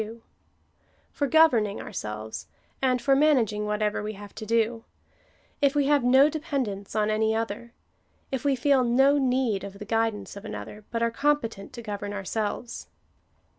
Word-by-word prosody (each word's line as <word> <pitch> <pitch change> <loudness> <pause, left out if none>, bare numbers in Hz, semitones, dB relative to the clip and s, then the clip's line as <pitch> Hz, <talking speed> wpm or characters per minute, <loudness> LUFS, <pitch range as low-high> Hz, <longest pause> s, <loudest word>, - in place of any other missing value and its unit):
2) 220 +2 -7 0.9
for 285 - -1
governing 245 -10 +4
ourselves, 105 +1 -6 0.3
and 255 -2 +2
for 275 -1 +4
managing 240 -8 +2
whatever 210 0 0
we 210 +1 -4
have 205 0 -11
to 220 - -8
do 230 0 +1 0.4
— - - -36
if 280 0 +3
we 290 -1 +3
have 285 -2 +3
no 265 +3 +6
depend 300 -4 -2
ence 200 0 -7
on 215 0 +2
any 220 +1 +1
other* 225 +1 -3 0.3
— - - -41
if 265 -2 -2
we 280 -2 +2
feel 265 0 +3
no 270 +4 +4
need 250 -6 +1
of 200 0 -8
the 210 - -8
guidance 225 -2 -1
of 200 - -9
another, 210 -1 -7
but 230 0 -1
are 230 - +1
competent 230 -7 -1
to 235 - -9
govern 205 -1 -5
ourselves. 210 +4 -4
230 Hz, 170 wpm, -26 LUFS, 210-270 Hz, 0.9 s, no